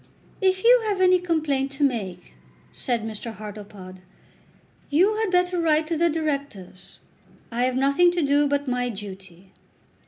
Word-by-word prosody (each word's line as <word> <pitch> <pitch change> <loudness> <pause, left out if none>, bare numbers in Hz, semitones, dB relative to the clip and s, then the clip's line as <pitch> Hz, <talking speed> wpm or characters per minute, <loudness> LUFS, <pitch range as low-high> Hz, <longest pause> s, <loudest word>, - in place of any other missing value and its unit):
"If 375 0 +1
you 485 0 +6
have 405 -3 -1
any 365 -1 +5
complaint 310 -6 -1
to 280 +2 -2
make," 200 -10 -2 0.4
said 240 -3 -2
Mr. 220 +1 -6
Hartlepod, 205 -3 -10 0.9
"you 375 +9 +3
had 440 -2 0
better 360 -1 +1
write 315 -1 +2
to 330 +1 -2
the 340 +2 +2
Directors. 280 - -5 0.5
I 240 +2 0
have 255 0 -1
nothing 280 +7 +3
to 345 -2 0
do 285 +1 +3
but 285 0 -1
my 250 -1 -1
duty." 195 -3 -10
280 Hz, 150 wpm, -24 LUFS, 215-340 Hz, 0.9 s, you